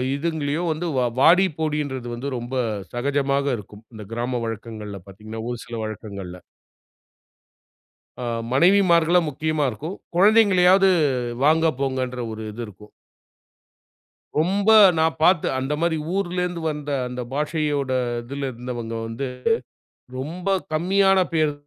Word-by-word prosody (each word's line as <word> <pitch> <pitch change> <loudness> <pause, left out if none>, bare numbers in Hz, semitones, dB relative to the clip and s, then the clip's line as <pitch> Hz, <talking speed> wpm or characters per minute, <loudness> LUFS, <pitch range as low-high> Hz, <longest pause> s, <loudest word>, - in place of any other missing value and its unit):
இதுங்களயோ 155 0 -2
வந்து 170 +3 -4
வ - - +3 0.2
வாடி 180 +5 +6
போடின்றது 145 -5 -2
வந்து 135 +4 -4
ரொம்ப 120 +2 -5 0.4
சகஜமாக 140 +2 0
இருக்கும். 105 +1 -12
இந்த 105 -2 -9
கிராம 120 +1 -2
வழக்கங்கள்ல 110 -3 -6
பார்த்தீங்கன்னா, 110 +3 -8
ஒரு 120 - -3
சில 120 -1 -6
வழக்கங்கள்ல. 100 -4 -7 1.8
ஆ, - - -3 0.3
மனைவிமார்கள 175 +1 +4
முக்கியமா 155 +1 -1
இருக்கும். 155 - -6 0.2
குழந்தைகளையாவது 195 -2 +5 0.5
வாங்க 160 +2 +4
போங்கன்ற 130 -2 -2
ஒரு 110 0 -7
இது 120 +2 -6
இருக்கும். 105 +1 -14 1.5
ரொம்ப, 195 +6 +2 0.3
நான் 160 0 +2
பார்த்து 170 -1 +4
அந்த 135 +2 -2
மாரி 170 -1 +1 0.2
ஊர்லேருந்து 180 -2 -2
வந்த 150 -1 -5 0.2
அந்த 125 0 -5
பாஷையோட 150 -2 -1 0.3
இதில 135 +2 -4
இருந்தவங்க 120 -1 -6
வந்து 115 +4 -4 0.9
ரொம்ப 170 +8 -5 0.3
கம்மியான 190 +3 +3
பேர் 155 -2 +2
145 Hz, 115 wpm, -23 LUFS, 120-170 Hz, 1.8 s, வாடி